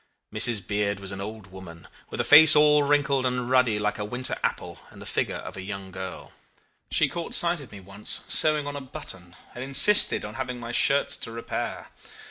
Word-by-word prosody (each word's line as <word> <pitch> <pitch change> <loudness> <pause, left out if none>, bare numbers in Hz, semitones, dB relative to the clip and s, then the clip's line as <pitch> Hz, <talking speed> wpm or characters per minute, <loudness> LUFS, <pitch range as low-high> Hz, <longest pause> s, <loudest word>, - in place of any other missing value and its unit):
Mrs. 110 -6 +2
Beard 100 0 -2
was 100 -1 -5
an 95 0 -7
old 105 -1 -9
woman, 85 -3 -13 0.2
with - - -8
a - - +1
face 150 +1 +8
all 150 0 +4
wrinkled 140 -2 0
and 125 -1 -3
ruddy 125 -4 +2
like 105 0 -3
a - - -3
winter 125 +5 -3
apple, - - -4
and - - -16
the - - -11
figure - - -3
of - - -9
a 95 - -8
young 95 -1 -8
girl. 95 0 -9 0.6
She - - +2
caught 170 -1 -5
sight 170 -2 +1
of 135 - -14
me 100 - -11
once, 100 +2 -4
sewing 155 -2 +2
on 145 0 -6
a 145 - -6
button, 90 -8 -9 0.2
and 125 - -8
insisted 140 - +5
on 105 - -9
having 125 0 -6
my 115 0 -8
shirts 140 +3 +1
to 115 - -7
repair. 115 0 -6
120 Hz, 205 wpm, -24 LUFS, 100-140 Hz, 0.6 s, face